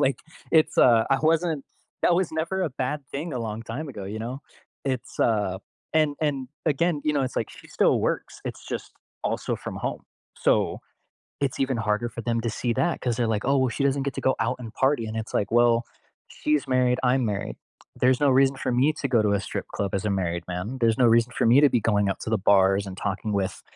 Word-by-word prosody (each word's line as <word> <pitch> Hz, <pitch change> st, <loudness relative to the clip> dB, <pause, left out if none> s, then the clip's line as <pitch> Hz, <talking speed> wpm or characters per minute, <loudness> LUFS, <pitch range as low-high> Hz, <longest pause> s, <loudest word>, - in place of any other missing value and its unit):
like, 140 Hz, -1 st, +2 dB, 0.3 s
it's, 160 Hz, -1 st, +3 dB
uh, 115 Hz, -2 st, +6 dB
I 135 Hz, -, +4 dB
wasn't 160 Hz, -2 st, +1 dB, 0.4 s
that 175 Hz, -, +4 dB
was 180 Hz, -1 st, +1 dB
never 170 Hz, +4 st, -1 dB
a -, -, -1 dB
bad 135 Hz, +3 st, -3 dB
thing 155 Hz, +4 st, -4 dB
a 125 Hz, -, -2 dB
long 110 Hz, 0 st, -4 dB
time 130 Hz, +8 st, -5 dB
ago, 105 Hz, -7 st, -7 dB
you 105 Hz, +3 st, -5 dB
know? 125 Hz, +4 st, -5 dB, 0.4 s
It's, 130 Hz, -3 st, -3 dB
uh, 105 Hz, -5 st, +1 dB, 0.3 s
and 155 Hz, -2 st, +2 dB
and, 140 Hz, -4 st, -1 dB, 0.2 s
again, 155 Hz, +1 st, +1 dB
you 150 Hz, -, +2 dB
know, 145 Hz, -, +1 dB
it's 130 Hz, -, -4 dB
like 110 Hz, -, -1 dB
she -, -, -14 dB
still -, -, +2 dB
works, -, -, -2 dB
it's -, -, -6 dB
just -, -, -5 dB, 0.3 s
also -, -, -1 dB
from -, -, -7 dB
home. -, -, -4 dB, 0.3 s
So, -, -, +1 dB, 0.6 s
it's 135 Hz, -2 st, -1 dB
even 135 Hz, -1 st, +1 dB
harder 110 Hz, +2 st, 0 dB
for -, -, -6 dB
them 115 Hz, +1 st, 0 dB
to 115 Hz, -, -1 dB
see 120 Hz, +2 st, -1 dB
that 140 Hz, +6 st, 0 dB
'cause 120 Hz, -3 st, -1 dB
they're 120 Hz, -1 st, +1 dB
like, 110 Hz, -2 st, -1 dB
"Oh, 135 Hz, -1 st, +3 dB
she 140 Hz, -, -3 dB
doesn't 140 Hz, 0 st, +1 dB
get 140 Hz, -, -1 dB
to -, -, -4 dB
go 130 Hz, -, +1 dB
out 115 Hz, +3 st, 0 dB
and 115 Hz, -2 st, -8 dB
party." 135 Hz, -4 st, +1 dB
And 110 Hz, +1 st, -5 dB
it's 110 Hz, 0 st, -4 dB
like, 100 Hz, -, 0 dB
"Well, 120 Hz, 0 st, +4 dB, 0.4 s
she's 150 Hz, -2 st, -1 dB
married, 125 Hz, -1 st, +2 dB
I'm 125 Hz, 0 st, +2 dB
married." 100 Hz, -2 st, -3 dB, 0.4 s
There's 125 Hz, +1 st, +3 dB
no 145 Hz, -, +4 dB
reason 135 Hz, +1 st, +4 dB
for -, -, -2 dB
me 130 Hz, +5 st, +3 dB
to 140 Hz, -, -3 dB
go 120 Hz, -4 st, +3 dB
to 105 Hz, -1 st, +2 dB
a 100 Hz, -, +1 dB
strip -, -, -5 dB
club 100 Hz, -1 st, -3 dB
as 95 Hz, -, -1 dB
a 105 Hz, -, 0 dB
married 85 Hz, -3 st, -1 dB
man. 90 Hz, +8 st, -4 dB
There's 115 Hz, +1 st, +3 dB
no 125 Hz, -, +5 dB
reason 115 Hz, +1 st, +4 dB
for -, -, +2 dB
me 125 Hz, +5 st, +6 dB
to 145 Hz, -, +6 dB
be 120 Hz, -, +2 dB
going 105 Hz, -2 st, +2 dB
out 95 Hz, -, -2 dB
to -, -, -4 dB
the 110 Hz, -, +2 dB
bars 95 Hz, +1 st, +3 dB
and 95 Hz, -, -7 dB
talking 100 Hz, +2 st, -2 dB
with, 100 Hz, -2 st, -2 dB
125 Hz, 235 wpm, -25 LUFS, 110-140 Hz, 0.6 s, uh